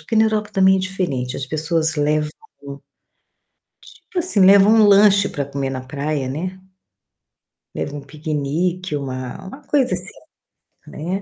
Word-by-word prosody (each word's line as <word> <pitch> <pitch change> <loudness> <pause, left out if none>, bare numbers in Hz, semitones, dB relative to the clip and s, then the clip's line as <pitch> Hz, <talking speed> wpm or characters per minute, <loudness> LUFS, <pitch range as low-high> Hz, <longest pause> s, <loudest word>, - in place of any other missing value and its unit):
porque 225 - -3
na 220 - +5
Europa 215 -1 -1
também 190 0 +4
é - - 0
diferente, 175 -10 -3
as 135 - -4
pessoas 160 +2 -1
levam 150 +1 0 1.7
tipo, 370 - -7
assim, 330 - 0
levam 195 +2 +7
um 220 -2 +6
lanche 200 0 +5
pra 145 - -3
comer 140 0 -4
na 130 - -4
praia, 140 0 -3
né. 180 +7 -5 1.2
Leva 145 - -4
um - - -6
piquenique, 155 +4 -3
uma 130 +2 -6
uma 270 +10 -11
coisa 270 -8 +1
assim, 180 +1 -7 0.8
né. 180 +6 -4
170 Hz, 145 wpm, -20 LUFS, 145-195 Hz, 1.7 s, levam